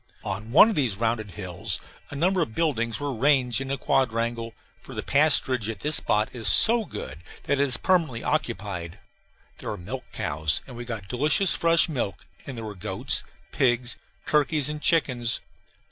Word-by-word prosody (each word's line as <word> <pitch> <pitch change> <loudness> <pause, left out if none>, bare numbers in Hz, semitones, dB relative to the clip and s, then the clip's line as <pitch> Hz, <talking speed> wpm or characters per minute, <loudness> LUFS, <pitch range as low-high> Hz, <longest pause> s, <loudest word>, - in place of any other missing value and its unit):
On 105 +4 -5
one 160 - +8
of 225 - -1
these 125 - 0
rounded 110 -2 -1
hills 95 +1 -5 0.3
a 145 - -8
number 180 +5 +1
of 115 -9 -3
buildings 125 -9 -1
were 145 -1 -3
ranged 130 0 +2
in 135 - -6
a 140 - -2
quadrangle, 115 -3 -1 0.3
for - - -12
the - - -4
pasturage 135 -6 +3
at 110 -3 -6
this 150 +1 +2
spot 105 +1 +1
is 115 -4 -2
so 225 - +8
good 75 - -8 0.2
that 140 - 0
it 140 - +2
is 125 - +2
permanently 160 -11 0
occupied. 100 - -3 0.6
There - - -6
were - - -4
milch 125 +9 -7
cows, 75 +1 -2
and 125 - -11
we 120 +1 -7
got 110 -5 -7
delicious 150 - +2
fresh 165 0 +3
milk; 120 - -4 0.2
and 135 -3 -7
there 115 - -6
were 105 - -6
goats, 90 - -1 0.3
pigs, 120 -1 0 0.3
turkeys, 150 -1 +1
and 150 0 -6
chickens. 125 -9 +1
125 Hz, 175 wpm, -25 LUFS, 110-150 Hz, 0.6 s, one